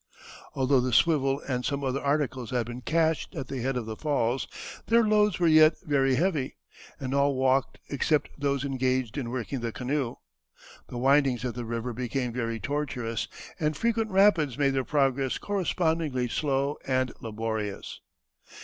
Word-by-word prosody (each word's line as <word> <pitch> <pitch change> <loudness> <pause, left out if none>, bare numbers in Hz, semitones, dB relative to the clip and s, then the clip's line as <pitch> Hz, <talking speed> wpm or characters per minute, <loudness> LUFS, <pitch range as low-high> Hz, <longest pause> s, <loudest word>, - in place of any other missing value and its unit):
Although 135 0 +3
the 125 0 -1
swivel 135 +1 +3
and 125 -2 -1
some 140 +1 -2
other 135 +1 -1
articles 140 -4 -1
had 125 -2 0
been 120 +2 -7
cached 160 +5 0
at 135 -5 -5
the 135 -3 -3
head 130 +1 -1
of 120 - -3
the 110 0 -5
falls, 135 -3 0 0.4
their 230 +1 +5
loads 210 -2 +3
were 175 - +2
yet 155 -1 +6
very 135 -3 +2
heavy, 155 -4 0 0.4
and 135 -2 -3
all 140 0 +2
walked 130 0 +1
except 145 +1 +1
those 140 -1 -1
engaged 130 -3 0
in 125 -5 -3
working 130 +2 -3
the 115 -1 -3
canoe. 130 0 -2 0.7
The 120 - -6
windings 135 -1 +3
of 125 - -2
the 120 +1 -5
river 115 +1 -3
became 125 +1 -2
very 115 -2 -2
tortuous, 130 -6 -2 0.3
and 150 -1 0
frequent 225 -1 0
rapids 190 - +4
made 140 -2 +3
their 135 -1 0
progress 135 -2 +1
correspondingly 165 -9 0
slow 140 +2 0
and 130 -2 +1
laborious. 110 -3 -4
135 Hz, 160 wpm, -27 LUFS, 125-150 Hz, 0.7 s, yet